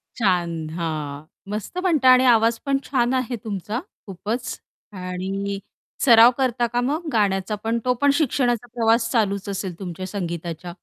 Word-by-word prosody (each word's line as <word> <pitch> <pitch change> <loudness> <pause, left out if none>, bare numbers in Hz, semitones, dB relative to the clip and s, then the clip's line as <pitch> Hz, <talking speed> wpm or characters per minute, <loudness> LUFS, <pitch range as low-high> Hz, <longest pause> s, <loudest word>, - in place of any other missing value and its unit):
छान. 170 -7 0
हां. 155 -3 -4 0.3
मस्त 210 - -5
म्हणता 320 -8 +3
आणि 255 +1 +4
आवाज 230 -1 +4
पण 275 -1 +2
छान 245 -2 +1
आहे 255 -2 -1
तुमचा 210 +2 -3 0.3
खूपच 210 +6 -4 0.4
आणि 195 +2 -3 0.5
सराव 235 -1 +8
करता 245 -2 +1
का 245 +1 -1
मग 305 +6 -2
गाण्याचा 200 -1 +1
पण, 230 +1 0
तो 250 - +3
पण 285 - +5
शिक्षणाचा 245 -5 +1
प्रवास 230 0 +2
चालूच 200 -4 0
असेल 190 -3 -4
तुमच्या 185 0 -6
संगीताच्या? 170 -2 -5
220 Hz, 145 wpm, -23 LUFS, 185-245 Hz, 0.5 s, सराव